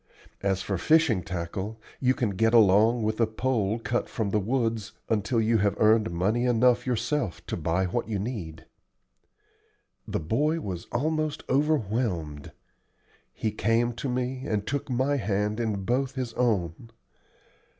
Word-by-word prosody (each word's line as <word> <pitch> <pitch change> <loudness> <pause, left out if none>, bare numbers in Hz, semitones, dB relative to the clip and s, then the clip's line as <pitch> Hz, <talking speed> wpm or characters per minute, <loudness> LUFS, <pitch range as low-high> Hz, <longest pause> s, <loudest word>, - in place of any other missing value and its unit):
As 95 -1 0
for 100 -3 -2
fishing 155 - +3
tackle, 95 +5 -5 0.2
you 130 0 +2
can 115 -5 0
get 110 +4 +2
along 110 +2 +5
with 110 +2 -1
a 115 - +4
pole 110 -2 0
cut 120 +1 -2
from 110 -4 -2
the 105 - +2
woods 115 -1 -1 0.2
until 110 +2 +1
you 110 0 +2
have 100 0 +1
earned 110 0 +4
money 100 +8 0
enough 125 +1 +3
yourself 125 - -1
to - - -3
buy 85 +3 0
what 90 +4 -2
you 105 - -1
need." 95 -7 -5 1.4
The - - -2
boy 145 - 0
was 90 - -5
almost 155 +3 -1
overwhelmed. 110 - 0 0.8
He 110 - -2
came 115 +3 +1
to 125 +3 -4
me, 125 +1 -2
and 105 -1 -1
took 140 0 -3
my 130 +3 +1
hand 105 -1 -1
in 105 -4 -1
both 130 +3 0
his 125 -3 -3
own. 110 -4 -1
110 Hz, 150 wpm, -27 LUFS, 100-125 Hz, 1.4 s, along